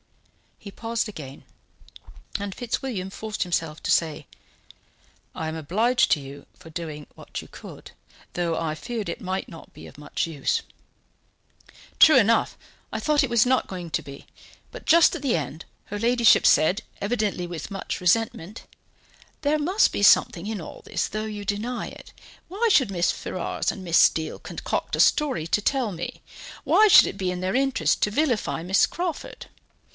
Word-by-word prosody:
He 200 - -11
paused 230 +2 -3
again, 140 -9 -10 1.0
and 200 -1 -4
Fitzwilliam 230 -5 -4
forced 215 +2 -6
himself 165 -3 -3
to - - -3
say: 155 -2 0 1.1
"I 160 - -4
am 160 - -4
obliged 220 - +1
to 150 - +4
you 140 0 -10
for 160 - -15
doing 155 -3 -6
what - - -8
you - - -13
could, - - -12 0.4
though 170 -2 -1
I 155 -2 -2
feared 225 +4 -5
it - - -5
might 190 -1 -3
not 165 - -13
be - - -12
of - - -15
much 150 - -3
avail." 150 -5 -10 1.5
"True 310 -4 +8
enough, 230 -1 +3 0.3
I - - -3
thought 300 -1 +2
it 270 - -1
was 235 -1 +4
not 255 +1 +1
going 180 -3 -7
to - - -1
be, 140 0 -11 0.5
but - - -10
just 335 +1 +5
at 325 - -6
the 265 - +1
end, 155 +1 -5 0.2
her 205 - -6
ladyship 235 0 +4
said, 180 +8 +4 0.2
evidently 205 -4 -1
with 170 -1 -7
much 195 - -4
resentment: 205 +1 0 0.8
'There 305 0 +1
must 370 +9 +2
be - - -3
something 190 -1 +4
in 220 -2 -3
all - - -10
this, - - -2
though 215 +1 -4
you 210 -1 -6
deny 215 +5 -3
it. - - -12 0.4
Why 435 +6 0
should 265 - +4
Mrs. 175 -3 +1
Ferrars 185 - -3
and 190 - -9
Miss 170 -2 +2
Steele 160 -1 +2
concoct - - -4
a - - -6
story 275 - +3
to 210 - +1
tell 255 -1 0
me? 175 -1 -6 0.4
Why 430 - +5
should 400 - +8
it - - -6
be 185 -1 -1
in 180 - -4
their 185 +4 -2
interest 270 0 +1
to 210 - +1
vilify 245 - 0
Miss 190 +3 +3
Crawford? 345 -2 -5
200 Hz, 170 wpm, -24 LUFS, 170-245 Hz, 1.5 s, True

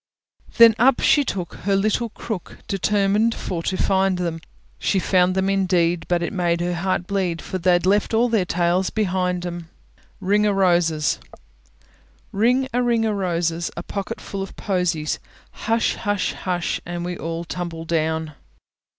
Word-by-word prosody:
Then 230 -1 +9
up 250 +2 +5
she 290 - +4
took 185 -9 -4
her 200 0 -1
little 215 +4 +1
crook, 215 -3 -6
Determined 205 +3 +1
for 175 -3 -4
to 185 +2 -2
find 190 -1 +2
them; 170 -2 -3 0.4
She - - +1
found 185 -1 +2
them 190 0 +1
indeed, 180 -3 +1
but 175 -1 +1
it 170 - -3
made 175 -3 +1
her 175 +1 -1
heart 180 0 -1
bleed, 185 -3 -1
For 185 - -5
they'd 175 0 +3
left 200 +2 +2
all 230 +2 +3
their 225 -5 +2
tails 175 +1 +1
behind 180 -4 -1
'em. 170 -2 -6 0.5
RING 210 +2 +2
O' 205 - +2
ROSES 175 -5 +2 1.1
Ring 245 +6 +2
a 245 - +2
ring 235 -2 +2
o' 220 - +1
roses, 170 -4 -1
A 170 - -4
pocket 200 +1 -5
full 195 - -6
of 195 - -7
posies; 180 -6 -1 0.3
Hush! 225 +1 0
hush! 205 -2 -1
hush! 180 -2 -2
And 175 0 -5
we 180 0 -3
all 165 0 -4
tumble 170 -1 -5
down. 160 -1 -1
185 Hz, 160 wpm, -22 LUFS, 175-205 Hz, 1.1 s, Then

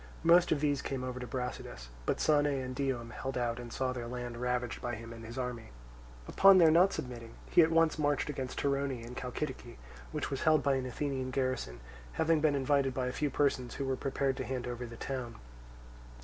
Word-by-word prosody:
Most 170 +1 +6
of 145 - +2
these 145 -2 +1
came 135 -2 -3
over 125 0 -4
to 125 - -6
Brasidas; 125 - -5 0.2
but - - +1
Sane 145 -1 +3
and 130 -3 -2
Dium 125 -4 -2
held 135 +2 -4
out 120 -1 -1
and 120 -1 -8
saw 130 +1 -1
their 120 -2 -5
land 120 0 -5
ravaged 125 -1 -2
by 120 -1 -2
him 115 +1 -9
and 115 0 -10
his 115 +3 -8
army. 125 -3 -4 0.6
Upon 195 -1 +7
their 165 -3 +7
not 180 +4 +5
submitting, 120 -3 -6 0.2
he - - +7
at 160 - +5
once 165 -1 +3
marched 145 -2 +1
against 130 -3 -4
Torone 140 -4 -1
in 120 - -8
Chalcidice, 125 - -5 0.3
which - - -3
was 135 - -2
held 155 -3 +4
by 140 +1 +3
an 130 -1 -1
Athenian 130 0 -2
garrison, 130 - -2 0.3
having 160 -1 +2
been 150 -2 +3
invited 135 -1 +1
by 130 - 0
a 125 - -1
few 150 +1 0
persons 130 -4 0
who 140 - -3
were 135 0 0
prepared 135 0 -1
to - - -2
hand 130 -2 -3
over 120 0 -5
the 115 0 -10
town. 125 -3 -4
130 Hz, 210 wpm, -32 LUFS, 125-145 Hz, 0.6 s, Upon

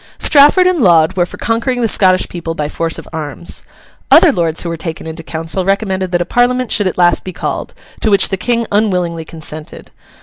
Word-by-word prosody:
Strafford 295 +5 +5
and 365 -2 +2
Laud 170 - +4
were 175 -1 +1
for - - -11
conquering 240 +2 -1
the 230 - +2
Scottish 185 -3 +2
people 170 -2 -6
by 150 -2 -2
force 165 +2 -3
of - - -10
arms. 135 - -4 0.5
Other - - +7
lords 165 -2 -1
who 170 - -4
were 165 - -3
taken 165 -1 -6
into 160 +1 -7
council, 165 +3 -2
recommended 190 -1 -1
that 175 -1 +1
a - - -17
Parliament 245 +3 0
should 205 -3 +2
at 185 - -3
last 175 -2 +2
be 185 - -6
called; - - -5 0.2
to 220 - 0
which 200 -1 +4
the 195 - -1
King 235 +4 -1
unwillingly 180 -6 0
consented. 155 -1 -9
180 Hz, 205 wpm, -14 LUFS, 165-220 Hz, 0.5 s, Other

